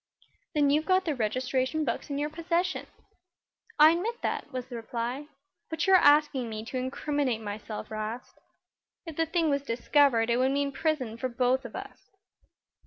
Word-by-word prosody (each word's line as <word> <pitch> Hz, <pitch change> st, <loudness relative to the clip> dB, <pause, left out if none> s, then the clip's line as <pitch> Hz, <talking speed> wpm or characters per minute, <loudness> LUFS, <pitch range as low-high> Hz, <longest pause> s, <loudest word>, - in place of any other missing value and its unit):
"Then 290 Hz, -2 st, +3 dB
you've 305 Hz, +2 st, +1 dB
got 375 Hz, 0 st, +3 dB
the 315 Hz, -, 0 dB
registration 255 Hz, +5 st, -1 dB
books 235 Hz, -, -3 dB
in 280 Hz, -, -2 dB
your 295 Hz, +1 st, -2 dB
possession." 340 Hz, +3 st, -1 dB, 0.9 s
"I 305 Hz, +1 st, +8 dB
admit 435 Hz, +8 st, -2 dB
that," -, -, -2 dB
was 255 Hz, -2 st, -4 dB
the 255 Hz, -1 st, -9 dB
reply. 235 Hz, +4 st, -4 dB, 0.4 s
"But 320 Hz, 0 st, -1 dB
you're 385 Hz, -1 st, +6 dB
asking 290 Hz, -6 st, +4 dB
me 215 Hz, 0 st, -6 dB
to 255 Hz, -, -5 dB
incriminate 260 Hz, -1 st, -1 dB
myself, 210 Hz, +1 st, -6 dB
'Rast. 215 Hz, +3 st, -6 dB, 0.7 s
If 325 Hz, -3 st, -7 dB
the 325 Hz, +1 st, 0 dB
thing 325 Hz, -2 st, +1 dB
was 280 Hz, 0 st, +1 dB
discovered 240 Hz, -2 st, +2 dB
it 235 Hz, -, +3 dB
would 260 Hz, +1 st, +3 dB
mean 280 Hz, 0 st, 0 dB
prison 270 Hz, -7 st, -1 dB
for 255 Hz, +2 st, -2 dB
both 255 Hz, +1 st, +1 dB
of 235 Hz, -, -8 dB
us." 400 Hz, +1 st, -9 dB
280 Hz, 170 wpm, -28 LUFS, 240-310 Hz, 0.9 s, I